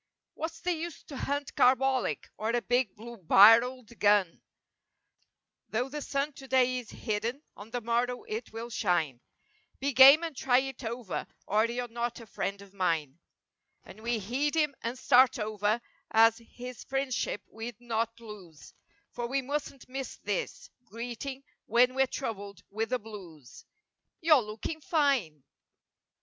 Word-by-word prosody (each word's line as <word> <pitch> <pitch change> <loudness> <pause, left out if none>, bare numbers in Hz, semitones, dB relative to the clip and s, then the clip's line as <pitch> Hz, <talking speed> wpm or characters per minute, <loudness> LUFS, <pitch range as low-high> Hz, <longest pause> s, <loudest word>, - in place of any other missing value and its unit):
"What's 325 +1 -5
the 360 - 0
use 335 0 -6
to 285 - -10
hunt 285 +1 -3
carbolic 260 0 +2
or 220 - -3
a 240 +1 +1
big 245 -4 +1
blue 235 +2 -10
barreled 225 +6 +5
gun." 205 -4 +3 0.6
" - - -49
'Though 245 +4 -1
the 295 +2 -5
sun 280 +1 -2
today 255 -1 +1
is 235 -5 -11
hidden, 230 +6 -3
on 205 +2 -11
the 245 +1 -3
morrow 240 +2 0
it 220 +2 -5
will 230 +2 -7
shine;" 160 - 0 0.6
"Be 280 +1 -1
game 270 +5 +9
and 325 -3 -4
try 250 -1 +3
it 265 0 -2
over 230 -3 -4 0.2
or 215 +2 +2
you're 245 +1 -3
not 235 +1 -3
a 230 - -10
friend 200 -1 -4
of 200 -1 -17
mine," 165 -6 -1 0.6
And 215 - -13
we 235 +1 0
heed 255 +9 -1
him 300 -3 +2
and 235 +3 -3
start 255 -1 +5
over 215 0 0 0.3
as 225 +1 +5
his 245 +1 -10
friendship 270 -5 -2
we'd 230 +2 -8
not 230 -1 -2
lose 190 - -12 0.4
For 240 -1 -4
we 270 +2 -1
mustn't 280 0 -4
miss 265 +1 -6
this - - -4
greeting 245 +4 -6 0.2
when 245 +3 +4
we're 265 0 +2
troubled 205 -8 -6
with 220 +2 -2
the 255 - +1
blues— 185 - -12 0.5
"You're 315 -5 +5
looking 220 +9 -6
fine!" 270 - +1
240 Hz, 150 wpm, -29 LUFS, 215-265 Hz, 0.6 s, game